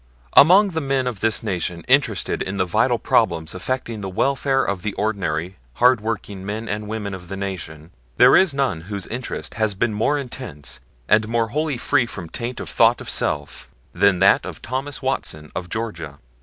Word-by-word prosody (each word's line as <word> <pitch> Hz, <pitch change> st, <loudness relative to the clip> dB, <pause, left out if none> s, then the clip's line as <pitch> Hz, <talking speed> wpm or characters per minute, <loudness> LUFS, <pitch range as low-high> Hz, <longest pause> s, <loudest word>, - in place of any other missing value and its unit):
Among 190 Hz, +7 st, +7 dB
the 160 Hz, -1 st, -2 dB
men 135 Hz, -2 st, 0 dB
of 120 Hz, -5 st, -3 dB
this 110 Hz, +1 st, +1 dB
Nation 90 Hz, -5 st, -3 dB
interested -, -, +2 dB
in 95 Hz, +1 st, -3 dB
the 95 Hz, -, +1 dB
vital 90 Hz, -, +2 dB
problems 80 Hz, 0 st, +1 dB
affecting 115 Hz, +3 st, -3 dB
the 95 Hz, -, -4 dB
welfare 135 Hz, +6 st, +1 dB
of 100 Hz, -2 st, -2 dB
the 105 Hz, +1 st, -3 dB
ordinary 95 Hz, -4 st, -2 dB, 0.2 s
hard 125 Hz, -, +4 dB
working 105 Hz, -3 st, -4 dB
men 105 Hz, +3 st, -4 dB
and 105 Hz, 0 st, -3 dB
women 105 Hz, -2 st, -4 dB
of 90 Hz, -2 st, -8 dB
the 95 Hz, -, -6 dB
Nation, 85 Hz, -5 st, -6 dB, 0.3 s
there 125 Hz, -, +7 dB
is 185 Hz, -4 st, +5 dB
none 135 Hz, -, -1 dB
whose 100 Hz, -3 st, -3 dB
interest 125 Hz, +2 st, -5 dB
has 110 Hz, -2 st, 0 dB
been 110 Hz, +3 st, 0 dB
more 115 Hz, +8 st, +1 dB
intense, 120 Hz, -, -7 dB, 0.3 s
and 110 Hz, +1 st, +3 dB
more 115 Hz, 0 st, 0 dB
wholly 150 Hz, +1 st, -1 dB
free 125 Hz, 0 st, +1 dB
from 85 Hz, -7 st, -7 dB
taint 120 Hz, +6 st, -5 dB
of -, -, -6 dB
thought -, -, +4 dB
of -, -, -3 dB
self, 75 Hz, 0 st, -1 dB, 0.2 s
than 100 Hz, -2 st, +3 dB
that 95 Hz, +2 st, +5 dB
of 90 Hz, -3 st, -7 dB
Thomas 135 Hz, +3 st, -4 dB
Watson, 75 Hz, -, -3 dB
of 90 Hz, -1 st, -4 dB
Georgia. 85 Hz, -11 st, -5 dB
105 Hz, 185 wpm, -22 LUFS, 90-125 Hz, 0.3 s, Among